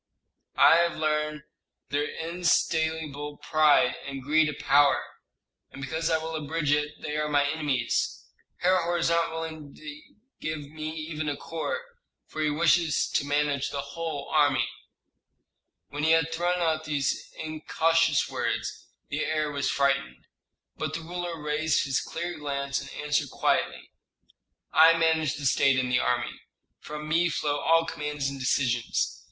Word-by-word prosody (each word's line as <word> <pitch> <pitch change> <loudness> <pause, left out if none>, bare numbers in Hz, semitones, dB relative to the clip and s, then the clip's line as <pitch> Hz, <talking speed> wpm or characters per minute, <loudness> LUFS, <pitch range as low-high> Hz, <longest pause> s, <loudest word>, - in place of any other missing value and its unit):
"I 165 - +7
have 170 0 +2
learned 150 -1 -1 0.5
their 145 0 0
insatiable 160 -3 -1
pride, 150 -5 +3
and 135 -1 -6
greed 155 +2 +3
of 150 - -6
power. 145 0 +4 0.7
And - - -12
because 160 +4 -2
I 160 - +3
will 160 0 -5
abridge 155 0 -1
it 150 0 0
they 150 -1 -3
are 150 0 -1
my 145 -1 +3
enemies. 145 -6 -1 0.4
Herhor 175 -1 +2
is 165 0 +1
not 170 0 +2
willing 160 -3 -6
to 150 -1 -9 0.4
give 150 -2 -5
me 155 0 -5
even 155 -1 -4
a 145 - -3
corps, 320 - -4 0.4
for 155 - -6
he 155 - +2
wishes 160 +1 +2
to - - +1
manage 145 -1 +1
the 140 - -3
whole 160 -4 -4
army." 140 -6 +3 1.2
When 145 +1 -4
he 160 +1 +5
had 165 0 +2
thrown 175 +2 0
out 160 -1 0
these 140 -2 -1
incautious 160 0 +1
words, - - -3 0.2
the 150 +2 -1
heir 155 0 -1
was 140 -1 -1
frightened. 140 - 0 0.5
But - - -3
the 165 - -4
ruler 175 0 -5
raised 150 +1 +1
his 135 -2 0
clear 170 0 -5
glance, 140 -1 -2
and - - -9 0.2
answered 150 -1 +1
quietly, - - -1 0.8
"I 165 +1 +7
manage 160 -3 +2
the 145 - -6
state 135 0 +4
and 125 -1 0
the 125 - +3
army. 125 -1 -1 0.4
From 150 0 -7
me 170 +3 +2
flow 145 -2 -1
all 165 +3 +3
commands 150 -3 -3
and 140 0 -7
decisions. 125 -2 0
150 Hz, 150 wpm, -27 LUFS, 145-160 Hz, 1.2 s, I